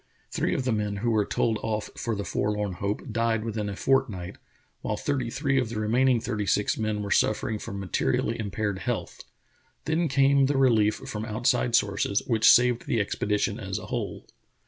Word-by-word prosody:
Three - - 0
of - - -1
the 130 - +1
men 105 -2 -1
who 120 - +2
were 105 -2 +1
told 110 -2 0
off 110 -1 -3
for 115 -2 -2
the 100 - -3
forlorn 105 -2 -1
hope 100 +7 -4
died 115 -1 0
within 105 -2 -3
a 100 - -5
fortnight, 110 -9 0 0.4
while - - -2
thirty 135 -5 -1
three 135 +2 0
of 125 -4 -1
the 110 -2 -4
remaining 120 +3 +3
thirtj' 110 -3 -2
six 105 - +2
men 110 -1 -2
were 100 - -5
suffering 110 0 +1
from 100 - -6
materially 95 +4 -1
impaired 105 -2 -2
health. - - -4 0.6
Then 160 +2 +1
came 140 0 +4
the 140 0 0
relief 110 -5 +4
from 105 0 -6
outside 120 +2 +1
sources, 100 -2 +1
which 115 -3 +4
saved 120 -1 +4
the 115 - +1
expedition 105 +1 -1
as 95 -2 -4
a 105 - -7
whole. 115 -4 -4
110 Hz, 185 wpm, -26 LUFS, 105-125 Hz, 0.6 s, came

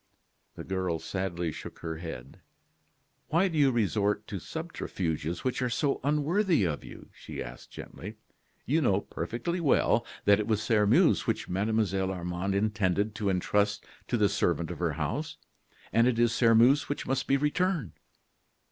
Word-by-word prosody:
The - - -7
girl 95 -3 -1
sadly 85 -2 -3
shook - - -9
her 80 -1 -3
head. 80 -7 -8 0.9
"Why 170 +5 +3
do 170 - -4
you 145 -3 +5
resort 105 -3 0
to 100 -3 -4
subterfuges 85 - -4
which 130 +1 -1
are 125 - +1
so 140 +3 0
unworthy 155 - +2
of 80 -5 -2
you?" - - -12
she - - -9
asked, - - -8
gently. 105 +5 -9 0.5
"You 155 +5 +2
know 100 -7 +2
perfectly 170 - -4
well 135 -6 +3 0.2
that 100 0 +5
it 105 - -2
was 110 -2 +1
Sairmeuse 105 -2 +3
which - - -1
Mademoiselle 95 -1 0
Armande 90 +1 -2
intended 105 0 0
to 105 -1 -1
intrust 105 +2 +1 0.2
to 120 - 0
the 105 -2 +4
servant 85 -5 0
of - - -7
her - - 0
house. - - -3 0.6
And 115 +3 +5
it 125 -2 +1
is 120 -1 +3
Sairmeuse 120 +5 +4
which 145 - -3
must 135 0 -1
be 140 - +3
returned." 150 - 0
105 Hz, 155 wpm, -29 LUFS, 95-135 Hz, 0.9 s, you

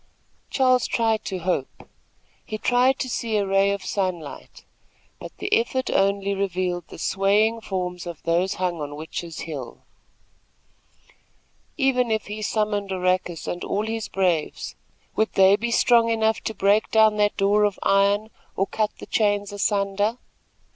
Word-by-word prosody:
Charles 255 -2 +3
tried 225 -2 +1
to 190 - -3
hope. 175 -6 -3 0.6
He 215 - -5
tried 250 +4 +3
to 260 - -3
see 230 -3 -1
a 200 - +1
ray 195 +1 +3
of 200 -1 -3
sunlight; 180 -6 -4 0.5
but - - -8
the 400 +2 -3
effort 280 - 0
only 200 0 +1
revealed 185 -3 -2
the - - -11
swaying 205 +6 +2
forms 180 -3 -4
of 170 -3 -8
those 175 +4 +1
hung 180 -3 -2
on 145 0 -5
Witches' 160 +2 -6
Hill. 145 -7 -7 1.9
Even 260 -4 +2
if 220 -1 0
he 210 +1 -6
summoned 210 -2 -1
Oracus 185 -2 -1
and 175 - -4
all 210 +2 -1
his 225 0 -3
braves, 180 -5 -1 0.4
would 220 - +1
they 195 +1 +6
be 235 +3 -3
strong 235 0 +4
enough 220 -1 +1
to 220 - -3
break 200 +3 +2
down 220 -1 +4
that 205 0 +1
door 205 +1 +3
of 205 -2 +1
iron, 200 +2 +2 0.2
or 195 - +1
cut 215 +1 -1
the - - -9
chains 205 -2 0
asunder! 205 +2 0
200 Hz, 150 wpm, -24 LUFS, 185-220 Hz, 1.9 s, they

